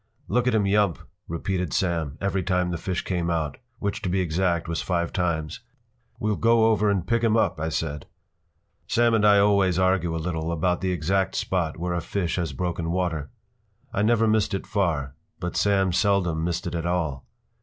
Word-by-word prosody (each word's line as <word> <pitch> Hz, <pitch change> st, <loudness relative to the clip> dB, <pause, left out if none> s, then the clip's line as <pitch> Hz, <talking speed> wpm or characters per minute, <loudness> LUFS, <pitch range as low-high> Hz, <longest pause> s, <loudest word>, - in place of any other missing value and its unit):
p> -, -, -7 dB
“Look 125 Hz, 0 st, +2 dB
at 125 Hz, -, +3 dB
him 105 Hz, -2 st, +2 dB
yump!” 100 Hz, -3 st, +2 dB, 0.3 s
repeated 90 Hz, 0 st, -2 dB
Sam, 85 Hz, -5 st, -1 dB
every 100 Hz, -1 st, 0 dB
time 90 Hz, 0 st, 0 dB
the 85 Hz, -, -3 dB
fish 90 Hz, 0 st, -2 dB
came 90 Hz, -2 st, -1 dB
out, 80 Hz, -4 st, -1 dB, 0.2 s
which, 100 Hz, +1 st, -3 dB
to 95 Hz, -, -2 dB
be 95 Hz, +2 st, +1 dB
exact, 85 Hz, -1 st, 0 dB
was 85 Hz, 0 st, -2 dB
five 85 Hz, -2 st, -1 dB
times. 80 Hz, -4 st, -1 dB, 0.6 s
“We’ll 105 Hz, -1 st, 0 dB
go 115 Hz, -1 st, +4 dB
over 105 Hz, -1 st, +2 dB
and 95 Hz, -4 st, 0 dB
pick 115 Hz, +3 st, +1 dB
him 115 Hz, -1 st, +3 dB
up,” 95 Hz, -6 st, +1 dB
I 80 Hz, +1 st, -1 dB
said. 75 Hz, -2 st, -3 dB, 0.8 s
Sam 120 Hz, 0 st, +3 dB
and 110 Hz, -2 st, +3 dB
I 105 Hz, -1 st, +6 dB
always 100 Hz, -3 st, +3 dB
argue 95 Hz, -3 st, +2 dB
a -, -, -1 dB
little 80 Hz, 0 st, -2 dB
about 90 Hz, +2 st, 0 dB
the 95 Hz, -1 st, 0 dB
exact 90 Hz, +3 st, 0 dB
spot 85 Hz, -4 st, -1 dB
where 90 Hz, +1 st, -2 dB
a 85 Hz, -, -1 dB
fish 90 Hz, +1 st, -2 dB
has 85 Hz, -4 st, -1 dB
broken 85 Hz, +2 st, -3 dB
water. 85 Hz, -5 st, -1 dB, 0.6 s
I 100 Hz, -, 0 dB
never 115 Hz, +1 st, +3 dB
missed 110 Hz, -2 st, +2 dB
it 95 Hz, -, -4 dB
far, 80 Hz, -10 st, -1 dB, 0.3 s
but 90 Hz, 0 st, -4 dB
Sam 95 Hz, -2 st, +2 dB
seldom 90 Hz, -4 st, +1 dB
missed 85 Hz, 0 st, -2 dB
it 85 Hz, -, -3 dB
at 85 Hz, 0 st, -2 dB
all. 80 Hz, -7 st, -1 dB
90 Hz, 195 wpm, -25 LUFS, 85-100 Hz, 0.8 s, I